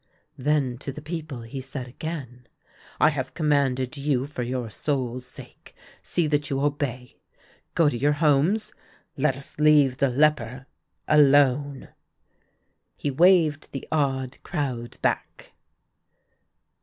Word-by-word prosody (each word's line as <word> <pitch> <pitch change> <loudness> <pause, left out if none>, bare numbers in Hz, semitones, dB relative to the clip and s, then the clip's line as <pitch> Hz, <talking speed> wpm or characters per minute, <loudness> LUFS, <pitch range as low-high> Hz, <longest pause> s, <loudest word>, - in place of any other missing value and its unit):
Then 135 -3 0
to 140 - -5
the 140 - -8
people 155 -4 -6
he 125 +4 -6
said 130 -1 -6
again: 125 -3 -7 0.3
" - - -25
I 155 - +6
have 130 -3 -4
com 155 -3 0
manded 130 -2 +1
you 140 -2 0
for 145 -3 -6
your 125 0 -2
souls' 125 -1 -2
sake; - - -13 0.3
see 170 - 0
that 145 -1 0
you 135 - -1
obey. 140 -4 -2 0.6
Go 165 - +4
to 145 - +1
your 145 +5 +2
homes. 155 +8 +2 0.4
Let 135 -1 +1
us 135 +1 -10
leave 150 -4 +5
the 140 0 +2
leper 135 -2 +1 0.2
— - - -48
alone." 145 -2 +4 1.1
He 145 - -2
waved 160 -1 +3
the 135 - -6
awed 135 -4 -1
crowd 125 -5 -4
back. - - -2
140 Hz, 135 wpm, -25 LUFS, 130-150 Hz, 1.1 s, I